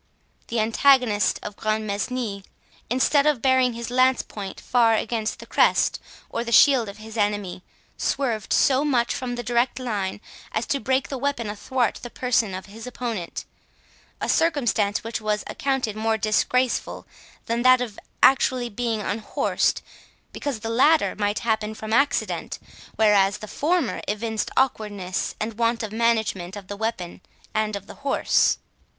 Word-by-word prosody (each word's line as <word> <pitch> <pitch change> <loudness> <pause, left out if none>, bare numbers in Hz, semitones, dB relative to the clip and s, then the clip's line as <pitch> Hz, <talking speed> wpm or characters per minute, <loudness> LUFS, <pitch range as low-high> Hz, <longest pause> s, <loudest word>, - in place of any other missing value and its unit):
The 230 - -1
antagonist 225 -1 +3
of 210 - -6
Grantmesnil, 215 0 -2 0.5
instead 280 +4 +3
of 295 -5 +2
bearing 260 0 +3
his 235 +1 -6
lance 255 +1 +3
point 200 -2 -8
fair 230 -2 +3
against 220 0 -2
the - - -11
crest - - +2 0.3
or 230 - -3
the 235 - -5
shield 250 -3 +6
of 200 - -10
his 220 +1 -10
enemy, 205 -3 -1 0.4
swerved 235 -7 -1
so 270 +1 +4
much 250 -5 +1
from 245 -1 -4
the 240 - -5
direct 240 +2 +1
line 210 -7 -3 0.3
as 225 - -1
to 280 - -1
break 265 0 0
the 270 - -4
weapon 245 -6 -2
athwart 240 +2 -1
the 240 - -7
person 235 -6 0
of 190 - -7
his 225 +4 -10
opponent—a 230 -8 -8
circumstance 240 -10 +1
which 225 0 -4
was 210 -1 -1
accounted 265 -6 -2
more 220 +1 0
disgraceful 235 +4 0 0.4
than 230 +1 -1
that 255 0 +6
of 235 -4 -4
being - - -13 0.2
actually 255 -3 +4 0.3
unhorsed; 210 +1 -1 0.5
because 275 -7 -4
the 225 - -4
latter 295 +7 +4
might 205 0 -1
happen 220 -1 0
from 220 0 -5
accident, 280 +3 0 0.4
whereas 205 -2 +4
the 215 - -9
former 315 - 0
evinced 220 +1 -2
awkwardness 205 -8 -1
and 220 +1 -4
want 230 0 +1
of 215 - -4
management 220 -5 0
of 200 -2 -10
the 205 - -4
weapon 205 -5 -4 0.3
and 215 -1 0
of 200 -1 -6
the - - -10
horse. 280 0 +2
230 Hz, 150 wpm, -24 LUFS, 210-255 Hz, 0.5 s, shield